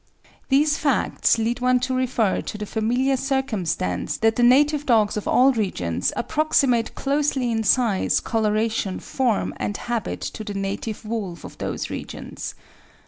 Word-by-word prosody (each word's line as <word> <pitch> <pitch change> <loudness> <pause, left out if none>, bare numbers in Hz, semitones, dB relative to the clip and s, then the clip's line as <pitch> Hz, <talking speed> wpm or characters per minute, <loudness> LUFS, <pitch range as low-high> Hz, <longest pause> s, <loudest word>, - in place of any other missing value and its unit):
These 295 +3 +3
facts 280 -4 +2
lead 230 +2 -1
one 250 0 +3
to 260 +1 -1
refer 245 -6 +1
to 215 - -6
the 210 - -4
familiar 245 +6 +1
circumstance 225 - -1
that 225 0 +2
the - - 0
native 290 +4 +4
dogs 220 -4 +3
of 210 - -4
all 260 +2 +5
regions 90 - -1
approximate 250 -3 +1
closely 275 -3 0
in 225 -1 0
size, 220 -3 +2
coloration, 215 -3 0
form, 245 -6 -1
and 205 - -3
habit 235 -2 -3
to 220 - -5
the 205 -1 -6
native 200 +3 -4
wolf 205 -7 -4
of - - -11
those - - -4
regions. - - -6
230 Hz, 145 wpm, -23 LUFS, 210-260 Hz, -, all